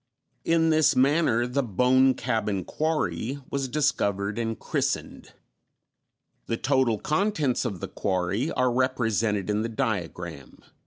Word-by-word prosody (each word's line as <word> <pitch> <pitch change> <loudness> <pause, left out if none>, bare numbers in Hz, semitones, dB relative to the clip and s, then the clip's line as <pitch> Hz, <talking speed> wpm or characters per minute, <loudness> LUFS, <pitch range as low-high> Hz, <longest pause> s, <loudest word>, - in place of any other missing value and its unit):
In 165 -1 +3
this 155 -2 +4
manner 130 -3 +3
the 125 +3 0
"Bone 130 +3 +3
Cabin 105 -6 -1
Quarry" 140 - -2
was 140 -1 -1
discovered 105 -7 0
and 115 -1 -2
christened. - - -3 1.1
The 115 - -1
total 130 -4 +2
contents 155 - 0
of 95 -5 -4
the - - -3
quarry 95 - -1
are 125 -1 +1
represented 115 -6 0
in 105 0 0
the 115 - -2
diagram 95 -8 -3
(not 70 - -11 0.2
reprinted.) - - -25
120 Hz, 135 wpm, -26 LUFS, 105-135 Hz, 1.1 s, this